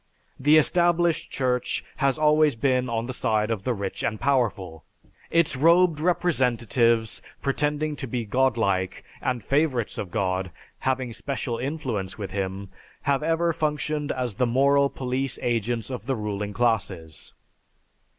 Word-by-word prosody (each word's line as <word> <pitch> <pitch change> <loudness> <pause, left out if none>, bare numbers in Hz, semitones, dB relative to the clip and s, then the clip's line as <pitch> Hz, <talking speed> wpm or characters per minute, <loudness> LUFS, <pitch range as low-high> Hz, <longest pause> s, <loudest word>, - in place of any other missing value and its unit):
The 150 +4 +5
established 175 +1 +2
Church 125 -1 -1
has 140 -1 +2
always 150 -2 +4
been 125 0 +1
on 115 0 -1
the 130 - -4
side 110 -2 0
of 105 -3 -3
the 125 - +1
rich 100 -1 -4
and 110 - -2
powerful. 105 - 0 0.5
Its 170 -4 +2
robed 165 +3 +4
representatives, 120 -9 +1 0.2
pretending 150 +2 0
to 135 - -4
be 120 -1 -3
Godlike 105 -6 +1 0.2
and 125 -4 -1
favorites 140 -5 0
of 95 - -4
God, 95 -2 -1 0.3
having 130 -2 -1
special 125 -2 -3
influence 125 - -3
with 100 -4 -5
Him, 95 0 -3 0.3
have 140 0 +1
ever 165 +2 +1
functioned 150 -1 -1
as 125 -3 -2
the 125 +3 +1
moral 140 +3 +3
police 130 0 -2
agents 120 +1 -1
of 125 -3 -6
the 135 - +1
ruling 105 -2 -3
classes. 95 -8 -1
125 Hz, 140 wpm, -25 LUFS, 110-145 Hz, 0.5 s, The